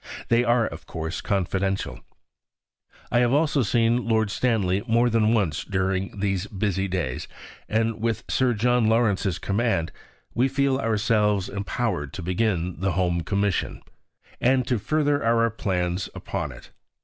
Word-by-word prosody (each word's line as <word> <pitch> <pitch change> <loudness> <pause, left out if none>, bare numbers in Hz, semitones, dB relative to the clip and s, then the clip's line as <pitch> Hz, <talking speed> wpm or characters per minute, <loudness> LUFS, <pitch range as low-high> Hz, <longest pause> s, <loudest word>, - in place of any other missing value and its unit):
They 120 +1 +4
are, 120 -1 +3
of - - -7
course, 80 +2 -4
confidential. 95 0 -1 1.1
I 120 - +3
have 120 +1 +3
also 145 -1 +2
seen 115 +1 +2
Lord 110 -3 +2
Stanley 100 -5 +1
more 120 +1 +3
than 110 -1 +3
once 100 -10 +1
during 95 0 -2
these 100 -1 -1
busy 95 -1 -1
days. 85 -9 -3 0.4
And 110 0 0
with 115 -2 -1
Sir 125 -2 +1
John 120 +1 +2
Lawrence's 105 -5 +2
command, 100 -5 0 0.4
we 125 +3 +2
feel 135 0 +1
ourselves 105 -4 +1
empowered 100 - -2
to 90 - -6
begin 90 -1 -1
the 95 0 0
Home 90 -2 +1
Commission, 100 +2 -1 0.6
and 130 0 +3
to 125 -3 0
further 145 +3 +1
our 115 0 +3
plans 90 -4 -2
upon - - -4
it. - - -13
105 Hz, 140 wpm, -25 LUFS, 95-120 Hz, 1.1 s, They